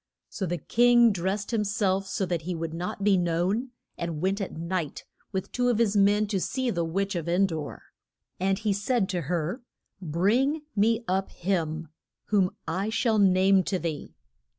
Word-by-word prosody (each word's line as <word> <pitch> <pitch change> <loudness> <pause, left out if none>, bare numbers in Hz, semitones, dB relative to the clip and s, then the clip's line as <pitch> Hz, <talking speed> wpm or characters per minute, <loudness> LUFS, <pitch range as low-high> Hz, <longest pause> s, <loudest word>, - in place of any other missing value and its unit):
So 190 - -3
the 175 +1 -1
king 240 +6 +5
drest 195 +4 -2
him 220 -2 +2
self 195 -2 0
so 190 0 -1
that 175 -3 -2
he 175 +2 -4
would 165 -1 -4
not 180 +4 -4
be 200 -2 +4
known, 180 +8 0 0.3
and 170 -3 -3
went 195 +4 0
at 195 - -3
night 170 -2 -3 0.3
with 190 -2 -3
two 245 0 +1
of 240 - +2
his 220 -3 +2
men 205 +1 +4
to 200 -3 0
see 260 +6 -1
the 170 -4 -1
witch 195 +5 -1
of 170 -3 -3
En 180 +3 +3
dor. 160 -5 -5 0.6
And 190 +1 +1
he 215 -1 0
said 205 +1 0
to 180 -2 -1
her, 170 - -2 0.4
Bring 220 - +1
me 225 +3 +2
up 190 +1 0
him 165 -4 -2 0.4
whom 195 -3 +3 0.2
I 190 +6 -1
shall 220 -1 +1
name 190 0 +5
to 190 - 0
thee. 165 -4 -5
190 Hz, 180 wpm, -27 LUFS, 175-210 Hz, 0.6 s, king